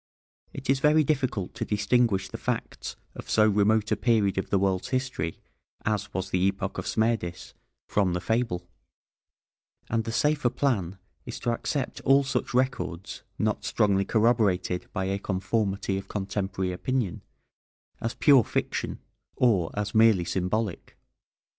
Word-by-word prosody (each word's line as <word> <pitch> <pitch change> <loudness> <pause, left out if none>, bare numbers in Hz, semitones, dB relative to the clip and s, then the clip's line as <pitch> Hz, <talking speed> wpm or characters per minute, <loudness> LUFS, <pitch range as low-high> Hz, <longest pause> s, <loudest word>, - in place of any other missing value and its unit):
It - - -8
is 135 +1 +3
very 150 +2 +4
difficult 130 -10 -1
to 120 - -4
distinguish 105 -2 +1
the - - -8
facts - - -3 0.2
of - - -10
so 110 0 +5
remote 105 +1 +2
a - - +4
period 105 -5 +2
of - - -4
the 100 - +3
world's 95 -1 0
history 130 -11 -2 0.5
as 105 -1 -1
was 95 +1 -4
the 90 - +1
epoch 100 0 -2
of - - -5
Smerdis 110 -6 -1 0.3
from 95 -4 +1
the 90 - 0
fable, 95 -4 -1 1.2
and 115 0 +1
the 115 - -4
safer 150 +1 +2
plan 110 -9 -1 0.3
is - - -6
to 120 - 0
accept 130 +3 -3
all 135 +1 +5
such 135 - -2
records, 125 -9 -1 0.2
not - - 0
strongly 100 -2 +2
corroborated 105 -5 +1
by 95 - -2
a 95 +1 -1
conformity 95 0 -1
of 95 - -10
contemporary 95 -2 -2
opinion, 110 0 -2 0.8
as 115 - -2
pure 140 -5 +6
fiction, - - -2 0.4
or 100 -10 +3
as 105 0 -2
merely 110 -5 +5
symbolic. 95 +3 -2
105 Hz, 145 wpm, -27 LUFS, 95-120 Hz, 1.2 s, pure